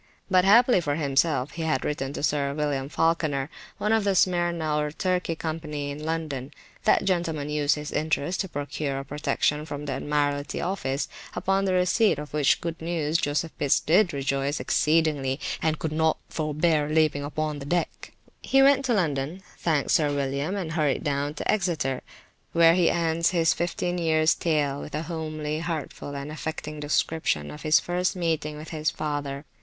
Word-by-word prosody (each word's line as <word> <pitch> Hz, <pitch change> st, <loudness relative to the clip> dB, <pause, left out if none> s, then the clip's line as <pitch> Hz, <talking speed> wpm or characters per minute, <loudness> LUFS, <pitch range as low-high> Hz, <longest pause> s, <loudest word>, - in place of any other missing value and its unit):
But 185 Hz, -1 st, +5 dB
happily 235 Hz, 0 st, +6 dB
for 145 Hz, -3 st, -1 dB
himself 145 Hz, -2 st, +1 dB
he 165 Hz, -, -6 dB
had 155 Hz, -5 st, 0 dB
written 135 Hz, -2 st, -2 dB
to -, -, -5 dB
Sir 140 Hz, -2 st, 0 dB
William 145 Hz, -3 st, -1 dB
Falkener, 155 Hz, -4 st, 0 dB, 0.3 s
one 210 Hz, +1 st, +1 dB
of 220 Hz, -1 st, +3 dB
the 200 Hz, -1 st, +1 dB
Smyrna 175 Hz, -4 st, +1 dB
or 150 Hz, 0 st, 0 dB
Turkey 180 Hz, 0 st, -1 dB
company 155 Hz, -3 st, -4 dB
in 145 Hz, +2 st, -7 dB
London; 155 Hz, -4 st, -3 dB, 0.3 s
that -, -, +4 dB
gentleman 165 Hz, -6 st, -1 dB
used 150 Hz, -1 st, +2 dB
his 150 Hz, 0 st, -6 dB
interest 155 Hz, +3 st, 0 dB
to 190 Hz, -, -5 dB
procure 145 Hz, -1 st, -3 dB
a 135 Hz, -, -5 dB
protection 150 Hz, +1 st, 0 dB
from 150 Hz, -1 st, -6 dB
the 140 Hz, -, -2 dB
Admiralty 145 Hz, +1 st, -1 dB
office, 145 Hz, -7 st, -2 dB, 0.3 s
upon 195 Hz, +1 st, +1 dB
the 190 Hz, -, +1 dB
receipt 185 Hz, +1 st, +3 dB
of 150 Hz, 0 st, -7 dB
which 150 Hz, -2 st, +3 dB
good 165 Hz, -1 st, -4 dB
news, 160 Hz, -1 st, 0 dB
Joseph 150 Hz, +3 st, -1 dB
Pitts 140 Hz, -, +3 dB
did 175 Hz, +4 st, +3 dB
rejoice 140 Hz, +1 st, -1 dB
exceedingly 150 Hz, -4 st, +1 dB, 0.2 s
and 160 Hz, -1 st, +1 dB
could 160 Hz, -, -3 dB
not 160 Hz, 0 st, +2 dB
forbear 155 Hz, 0 st, +1 dB
leaping 155 Hz, -2 st, +2 dB
upon 150 Hz, 0 st, -3 dB
the 140 Hz, -, -7 dB
deck. 175 Hz, +1 st, -2 dB, 0.3 s
He 270 Hz, 0 st, +4 dB
went 275 Hz, 0 st, +5 dB
to 245 Hz, -3 st, +2 dB
London, 160 Hz, 0 st, -1 dB, 0.2 s
thanked 155 Hz, -5 st, +1 dB
Sir 150 Hz, -2 st, +3 dB
William, 140 Hz, +5 st, -1 dB
and 180 Hz, -5 st, -3 dB
hurried 155 Hz, -4 st, 0 dB
down 145 Hz, +1 st, -1 dB
to -, -, 0 dB
Exeter, 165 Hz, -10 st, 0 dB, 0.5 s
where 165 Hz, 0 st, +6 dB
he 175 Hz, -1 st, +4 dB
ends 165 Hz, -1 st, +1 dB
his 165 Hz, -3 st, +3 dB
fifteen 175 Hz, +1 st, -2 dB
years 160 Hz, -1 st, +3 dB
tale 145 Hz, -4 st, 0 dB
with 150 Hz, -, -7 dB
a 155 Hz, -, -2 dB
homely, 155 Hz, -2 st, -4 dB
heartful 160 Hz, -3 st, -5 dB
and 140 Hz, +2 st, -5 dB
affecting 155 Hz, -1 st, -5 dB
description 145 Hz, -, 0 dB
of 150 Hz, -, -9 dB
his 155 Hz, -1 st, +4 dB
first 180 Hz, +4 st, -1 dB
meeting 160 Hz, -4 st, -1 dB
with 155 Hz, +1 st, -9 dB
his 155 Hz, -1 st, -1 dB
father. 145 Hz, -1 st, -4 dB
155 Hz, 175 wpm, -26 LUFS, 145-170 Hz, 0.5 s, happily